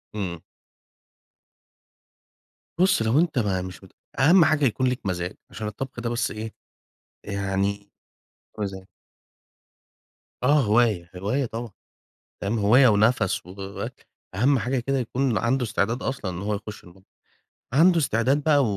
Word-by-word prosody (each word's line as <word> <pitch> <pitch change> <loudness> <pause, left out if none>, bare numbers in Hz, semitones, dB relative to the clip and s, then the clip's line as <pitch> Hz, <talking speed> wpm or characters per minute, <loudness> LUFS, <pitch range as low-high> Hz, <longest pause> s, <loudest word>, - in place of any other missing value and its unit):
إمم. 90 -5 -4 2.4
بُصّ 185 -6 +4
لو 110 +6 +3
أنت 160 -6 +1
ما 95 -4 0
مش 95 +1 -8
مت 95 - -15 0.3
أهم 165 +5 +6
حاجة 155 -2 +2
يكون 130 +1 +1
ليك 125 -4 -2
مزاج، 90 0 -2
عشان 110 - -6
الطبخ 120 +4 -6
ده 120 - -2
بس 120 -1 -1
إيه، 110 +1 -6 0.7
يعني 100 0 -2 0.7
مزاج. 95 -2 -4 1.6
آه 145 +3 +4
هواية، 105 -6 +2
هواية 105 +9 -1
طبعًا، 115 -1 -6 0.7
ام 105 +3 0
هواية 120 +6 +6
ونفَس 105 -2 +2
و 95 +2 -6 0.5
أهم 130 +6 +3
حاجة 125 +4 -1
كده 135 +3 -1
يكون 125 0 0
عَنده 125 +2 +1
إستعداد 115 +2 -1
أصلًا 130 -8 -3
إن 90 +1 -6
هو 105 0 -1
يخش 105 +1 -8
المطبخ، 95 +2 -18 0.7
عَنده 170 +5 +5
إستعداد 135 +1 +1
بقى 145 -2 +4
110 Hz, 130 wpm, -24 LUFS, 100-135 Hz, 2.4 s, أهم